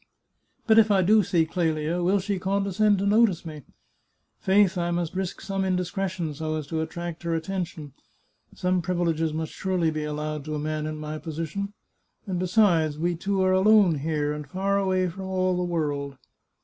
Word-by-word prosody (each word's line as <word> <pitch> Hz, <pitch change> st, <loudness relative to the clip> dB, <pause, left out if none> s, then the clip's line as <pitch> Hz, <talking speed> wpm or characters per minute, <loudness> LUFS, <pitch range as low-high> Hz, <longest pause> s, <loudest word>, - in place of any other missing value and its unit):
But 225 Hz, -1 st, +6 dB
if 220 Hz, -1 st, +5 dB
I 195 Hz, -2 st, +4 dB
do 215 Hz, +4 st, +5 dB
see 170 Hz, -3 st, +2 dB
Clelia, 160 Hz, 0 st, -1 dB
will 185 Hz, +3 st, +3 dB
she 195 Hz, 0 st, -2 dB
condescend 200 Hz, +2 st, +1 dB
to 195 Hz, -, -1 dB
notice 205 Hz, -4 st, +3 dB
me? 155 Hz, -2 st, -7 dB, 0.8 s
Faith, 195 Hz, -1 st, +3 dB
I 175 Hz, -1 st, -1 dB
must 175 Hz, -2 st, -2 dB
risk 190 Hz, -1 st, -3 dB
some 195 Hz, -1 st, -2 dB
indiscretion, 180 Hz, -2 st, -2 dB
so 155 Hz, +1 st, -3 dB
as 155 Hz, -2 st, -4 dB
to 160 Hz, -1 st, -1 dB
attract 170 Hz, +1 st, -5 dB
her 170 Hz, -1 st, -1 dB
attention. 165 Hz, -4 st, -4 dB, 0.6 s
Some 180 Hz, 0 st, 0 dB
privileges 165 Hz, -2 st, 0 dB
must 160 Hz, 0 st, -4 dB
surely 180 Hz, -4 st, 0 dB
be 155 Hz, -1 st, -3 dB
allowed 150 Hz, 0 st, -3 dB
to 155 Hz, -1 st, -3 dB
a -, -, -2 dB
man 155 Hz, 0 st, -2 dB
in 155 Hz, 0 st, -4 dB
my 155 Hz, 0 st, -5 dB
position. 165 Hz, +6 st, -4 dB, 0.5 s
And 185 Hz, -3 st, -2 dB
besides, 175 Hz, -5 st, +3 dB
we 175 Hz, +3 st, 0 dB
two 195 Hz, +3 st, 0 dB
are 185 Hz, 0 st, +3 dB
alone 190 Hz, -4 st, +5 dB
here, 150 Hz, 0 st, -1 dB
and 150 Hz, -1 st, -6 dB
far 195 Hz, +4 st, 0 dB
away 185 Hz, -1 st, +1 dB
from 190 Hz, +2 st, -6 dB
all 185 Hz, -1 st, +1 dB
the 180 Hz, -, -1 dB
world. 145 Hz, -5 st, -2 dB
175 Hz, 180 wpm, -26 LUFS, 155-190 Hz, 0.8 s, But